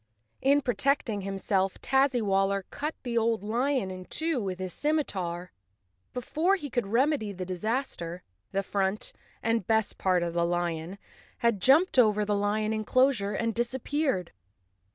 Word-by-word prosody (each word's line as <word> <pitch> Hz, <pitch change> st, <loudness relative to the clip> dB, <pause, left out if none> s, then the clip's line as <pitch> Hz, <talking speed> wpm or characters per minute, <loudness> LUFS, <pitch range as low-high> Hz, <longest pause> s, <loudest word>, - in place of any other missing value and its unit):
In 280 Hz, +1 st, +4 dB
protecting 245 Hz, -4 st, +1 dB
himself 195 Hz, 0 st, -1 dB
Tazzywaller 200 Hz, -8 st, +2 dB
cut 300 Hz, +2 st, -3 dB
the 235 Hz, -2 st, 0 dB
old 225 Hz, -3 st, 0 dB
lion 240 Hz, -1 st, 0 dB
in 185 Hz, 0 st, -8 dB
two 315 Hz, -, 0 dB
with 190 Hz, -3 st, -3 dB
his 185 Hz, -1 st, -4 dB
scimitar. 185 Hz, -, -1 dB, 0.6 s
Before 315 Hz, +10 st, +1 dB
he 295 Hz, -8 st, -6 dB
could 240 Hz, -4 st, -1 dB
remedy 240 Hz, 0 st, +1 dB
the 185 Hz, -1 st, -5 dB
dis¬ 180 Hz, 0 st, -6 dB
aster 215 Hz, -8 st, -2 dB, 0.3 s
the 195 Hz, 0 st, 0 dB
front, 195 Hz, +1 st, -1 dB, 0.3 s
and 225 Hz, -4 st, 0 dB
best 220 Hz, -2 st, +1 dB
part, 185 Hz, -2 st, +2 dB
of 170 Hz, -1 st, -2 dB
the 170 Hz, 0 st, +1 dB
lion 170 Hz, +1 st, -2 dB, 0.5 s
had 225 Hz, -5 st, +2 dB
jumped 285 Hz, -, +5 dB
over 210 Hz, -3 st, +4 dB
the 210 Hz, -, 0 dB
lion 210 Hz, +2 st, 0 dB
enclosure 220 Hz, -1 st, +2 dB
and 230 Hz, +2 st, -1 dB
disappeared. 240 Hz, -, -1 dB
215 Hz, 145 wpm, -28 LUFS, 190-260 Hz, 0.6 s, jumped